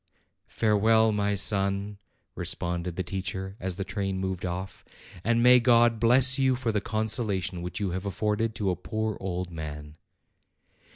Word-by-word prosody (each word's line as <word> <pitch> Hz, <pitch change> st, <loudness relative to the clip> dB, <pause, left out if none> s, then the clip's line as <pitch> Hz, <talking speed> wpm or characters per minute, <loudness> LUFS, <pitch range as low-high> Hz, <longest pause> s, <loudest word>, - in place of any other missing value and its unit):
"Farewell, 110 Hz, +1 st, +3 dB
my 105 Hz, -1 st, 0 dB
son!" 100 Hz, 0 st, +1 dB, 0.3 s
responded 85 Hz, 0 st, -2 dB
the 95 Hz, -, -2 dB
teacher 95 Hz, +1 st, -5 dB
as 95 Hz, -1 st, -1 dB
the 95 Hz, -, -3 dB
train 95 Hz, -1 st, -3 dB
moved 95 Hz, -1 st, -3 dB
off; 90 Hz, +2 st, -6 dB, 0.4 s
"and 115 Hz, +1 st, +2 dB
may 125 Hz, 0 st, +7 dB
God 120 Hz, -2 st, +4 dB
bless 130 Hz, +4 st, +4 dB
you 130 Hz, -1 st, +3 dB
for 120 Hz, -2 st, -2 dB
the 105 Hz, -2 st, -1 dB
consolation 110 Hz, -5 st, -1 dB
which 90 Hz, +1 st, -5 dB
you 100 Hz, -3 st, -1 dB
have 95 Hz, +3 st, -4 dB
afforded 105 Hz, +3 st, -1 dB
to 100 Hz, -3 st, 0 dB
a -, -, -1 dB
poor 110 Hz, +4 st, -3 dB
old 90 Hz, -1 st, -4 dB
man!" 75 Hz, -2 st, -8 dB
100 Hz, 155 wpm, -27 LUFS, 95-110 Hz, 0.4 s, may